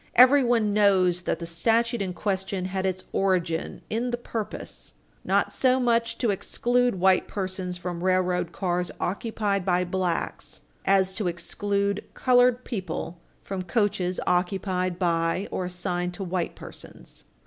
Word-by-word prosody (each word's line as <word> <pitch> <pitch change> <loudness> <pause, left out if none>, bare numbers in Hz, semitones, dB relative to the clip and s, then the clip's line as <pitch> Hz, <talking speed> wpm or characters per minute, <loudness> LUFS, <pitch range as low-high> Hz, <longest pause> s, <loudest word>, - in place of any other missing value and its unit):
Everyone 245 -4 +5
knows 190 -4 +3
that - - -1
the 170 - -6
statute 230 +7 +1
in 185 -2 -2
question 190 -1 -2
had 190 0 -1
its 185 0 -2
origin 180 -4 0
in 235 +3 -1
the 240 - -1
purpose 225 -3 -6 0.3
not - - +1
so 260 0 +3
much 230 -2 +1
to 235 -4 +1
exclude 245 +2 +1
white 190 0 +4
persons 185 -2 -3
from 175 -1 -5
railroad 180 -2 +1
cars 180 -2 -1
occupied 200 0 -1
by 180 -1 +2
blacks 180 -1 -3 0.2
as 190 -1 +3
to 200 -1 -2
exclude 200 +4 -1
colored 250 -1 +4
people 180 -5 -5 0.2
from 195 -1 -4
coaches 185 -1 0
occupied 180 0 0
by 170 +1 0
or 185 - -2
assigned 180 0 -2
to 195 - -5
white 180 -1 -2
persons. - - -10
190 Hz, 135 wpm, -26 LUFS, 180-215 Hz, 0.3 s, Everyone